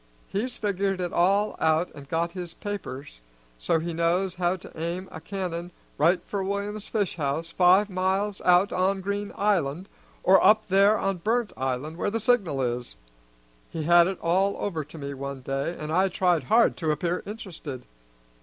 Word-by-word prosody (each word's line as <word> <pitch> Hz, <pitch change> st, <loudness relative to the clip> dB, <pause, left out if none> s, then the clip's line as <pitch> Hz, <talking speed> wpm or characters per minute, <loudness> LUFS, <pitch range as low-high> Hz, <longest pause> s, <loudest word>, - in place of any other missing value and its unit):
He's 240 Hz, +6 st, -3 dB
figured 195 Hz, -2 st, -1 dB
it 180 Hz, -1 st, -3 dB
all 200 Hz, +4 st, +2 dB
out 160 Hz, +2 st, +2 dB
an' 145 Hz, -2 st, -11 dB
got 170 Hz, +1 st, 0 dB
his 180 Hz, -2 st, -7 dB
papers 145 Hz, -, -7 dB, 0.4 s
so -, -, +1 dB
he 165 Hz, +1 st, -3 dB
knows 175 Hz, +3 st, +1 dB
how 180 Hz, 0 st, 0 dB
to 185 Hz, -, -12 dB
aim 170 Hz, +4 st, -4 dB
a 160 Hz, -, -8 dB
cannon 175 Hz, -1 st, -4 dB, 0.3 s
right 170 Hz, +5 st, +3 dB
for 200 Hz, -2 st, -3 dB
William's 200 Hz, +2 st, -3 dB
fish 205 Hz, -6 st, -1 dB
house 155 Hz, +2 st, -2 dB
five 185 Hz, +3 st, +5 dB
miles 190 Hz, +2 st, -1 dB
out 180 Hz, +3 st, +4 dB
on 190 Hz, +1 st, +1 dB
Green 200 Hz, +1 st, -3 dB
Island, 185 Hz, -4 st, 0 dB, 0.4 s
or 190 Hz, +1 st, +6 dB
up 215 Hz, 0 st, +5 dB
there 200 Hz, +3 st, +5 dB
on 195 Hz, -1 st, -1 dB
Burnt 225 Hz, +5 st, 0 dB
Island 135 Hz, +5 st, -3 dB
where -, -, 0 dB
the 225 Hz, +2 st, -1 dB
signal 200 Hz, -, +1 dB
is. 120 Hz, 0 st, -3 dB, 0.7 s
He 160 Hz, -, -4 dB
had 170 Hz, +2 st, +6 dB
it 190 Hz, -1 st, -3 dB
all 190 Hz, +4 st, +2 dB
over 165 Hz, -6 st, -2 dB
to 150 Hz, +3 st, -13 dB
me 140 Hz, -1 st, -5 dB
one 140 Hz, 0 st, -6 dB
day, 135 Hz, +6 st, -3 dB
an' 155 Hz, 0 st, -5 dB
I 185 Hz, +4 st, +3 dB
tried 175 Hz, -5 st, +1 dB
hard 230 Hz, -, +4 dB
to 160 Hz, -3 st, -2 dB
appear 170 Hz, +3 st, 0 dB
interested. 170 Hz, -, -7 dB
180 Hz, 175 wpm, -26 LUFS, 160-200 Hz, 0.7 s, or